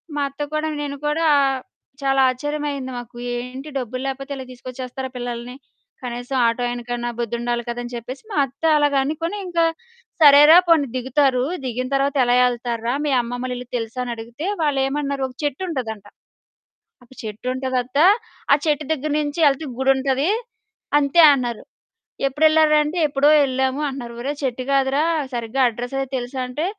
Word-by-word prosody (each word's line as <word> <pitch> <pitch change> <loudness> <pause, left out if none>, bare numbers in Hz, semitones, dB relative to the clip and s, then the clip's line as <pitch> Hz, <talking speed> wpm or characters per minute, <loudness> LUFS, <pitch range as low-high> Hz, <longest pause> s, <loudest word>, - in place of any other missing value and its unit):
మా 290 - -1
అత్త 280 +2 -10
కూడా, 305 +1 0
నేను 285 -1 -4
కూడా, 315 +2 +1 0.7
చాలా 270 0 +2
ఆశ్చర్యమయ్యింది 285 0 -3
మాకు. 240 0 -9 0.2
"ఏంటి? 255 +4 -6
డబ్బులు 255 0 -4
లేకపోతే 275 +1 -5
ఇలా 260 -1 -7
తీసుకొచ్చేస్తారా 255 +1 -7
పిల్లల్ని? 245 0 -5 0.5
కనీసం 245 +2 -4
ఆటో 230 +2 -1
ఆయనకన్నా 240 0 -3
బుద్ధుండాలి 235 +1 -2
కదా!" 235 +1 -3
అని 240 0 -8
చెప్పేసి 250 - -7
మా - - -3
అత్త 275 +5 -19 0.2
అలాగనుకొని, 295 +6 0
ఇంకా 335 -1 +2 0.6
"సరేరా 295 +3 +9
పోనీ 305 -5 +5
దిగుతారు. 260 0 +2 0.2
దిగిన 255 +1 -2
తర్వాత 275 +1 +1
ఎలా 245 0 +3
యెళ్తార్రా? 240 -1 -1
మీ 280 - +1
అమ్మమ్మోళ్ళ 245 +1 -4
ఇల్లు 250 0 -8
తెలుసా?" 225 +2 -5
అని 240 - -3
అడిగితే, 235 +9 -7 0.2
వాళ్ళేమన్నారు 275 -1 0
ఒక 250 - -16
చెట్టుంటదంట, 260 - -3 1.0
ఆప్ 260 - -19
"చెట్టుంటదత్త 255 +4 -3 0.5
ఆ - - +8
చెట్టు 300 -1 +1
దగ్గర 295 +1 -3
నుంచి 290 +3 -3
యెళ్తే 285 +2 +1
గుడుంటది 270 +4 +2 0.7
అంతే" 285 +4 +3
అన్నారు. 240 -3 -3 0.7
"ఎప్పుడెళ్ళార్రా?" 310 +1 +4
అంటే 325 +4 -4
"ఎప్పుడో 280 +1 +3
యెళ్ళాము" 265 +1 0
అంటున్నారు. 240 -3 -7
"ఒరేయ్ 285 +3 -4
చెట్టు 255 -1 -2
గాదురా 275 +2 +2 0.3
సరిగ్గా 235 +3 -2
అడ్రెస్సయీ 245 +4 -4
తెలుసా?" 250 +1 -5
అంటే 295 +7 -3
265 Hz, 140 wpm, -21 LUFS, 245-290 Hz, 1.0 s, సరేరా